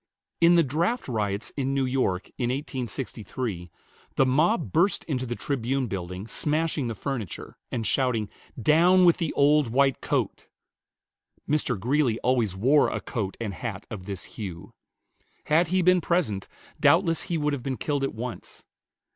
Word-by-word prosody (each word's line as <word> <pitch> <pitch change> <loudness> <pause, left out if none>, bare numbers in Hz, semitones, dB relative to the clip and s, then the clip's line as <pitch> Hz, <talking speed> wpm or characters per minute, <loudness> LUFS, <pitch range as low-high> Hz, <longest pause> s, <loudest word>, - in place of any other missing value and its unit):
In 170 +1 +6
the 170 - +5
draft 170 - -1
riots 105 -4 -2
in 135 -1 -1
New 135 -1 +1
York, 125 -8 0
in 120 -2 0
1863, 125 - -4 0.5
the 135 - +4
mob 155 - +2
burst 175 +6 +2
into 130 -5 -3
the 120 - -3
Tribune 135 0 -1
Building, 95 -2 -5
smashing 150 +2 0
the 115 - -4
furniture, 120 - -5 0.2
and 115 -2 -2
shouting, 125 -5 +1 0.3
"Down 175 - +5
with 170 - +5
the 165 -4 -1
old 145 0 +4
white 135 +2 +2
coat!" - - -2 1.0
Mr. 145 -7 0
Greeley 125 +1 +1
always 120 -7 +1
wore 135 +9 +4
a - - -3
coat 100 -6 -4
and 110 -4 -3
hat 100 -1 -6
of 100 -3 -7
this 100 -3 -5
hue. 90 -6 -8 0.7
Had 160 +3 +3
he 185 +2 +1
been 180 0 +4
present, 150 - 0 0.3
doubtless 165 -1 +3
he 170 -3 -1
would 150 -1 0
have 140 - -3
been 130 0 -3
killed 145 -2 -1
at 135 - -2
once. 120 +2 -7
130 Hz, 155 wpm, -26 LUFS, 110-150 Hz, 1.0 s, In